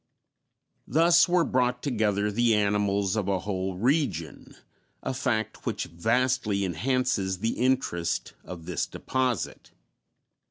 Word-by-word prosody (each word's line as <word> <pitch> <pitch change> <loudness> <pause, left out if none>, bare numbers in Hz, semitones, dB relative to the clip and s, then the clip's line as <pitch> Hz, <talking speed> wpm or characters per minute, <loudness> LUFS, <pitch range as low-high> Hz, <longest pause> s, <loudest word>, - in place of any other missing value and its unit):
Thus 165 +4 +5
were 175 -1 +4
brought 125 -1 0
together 105 -6 0
the 115 +1 +3
animals 100 -1 +1
of 105 -3 -1
a 95 -2 0
whole 95 -2 -3
region, 110 - -1 0.5
a - - -2
fact 110 -4 -2
which - - -1
vastly 115 +2 0
enhances 100 0 0
the 115 +5 -1
interest 120 -10 0
of 85 -3 -9
this - - -2
deposit. 130 -5 -2
110 Hz, 115 wpm, -27 LUFS, 95-130 Hz, 0.5 s, Thus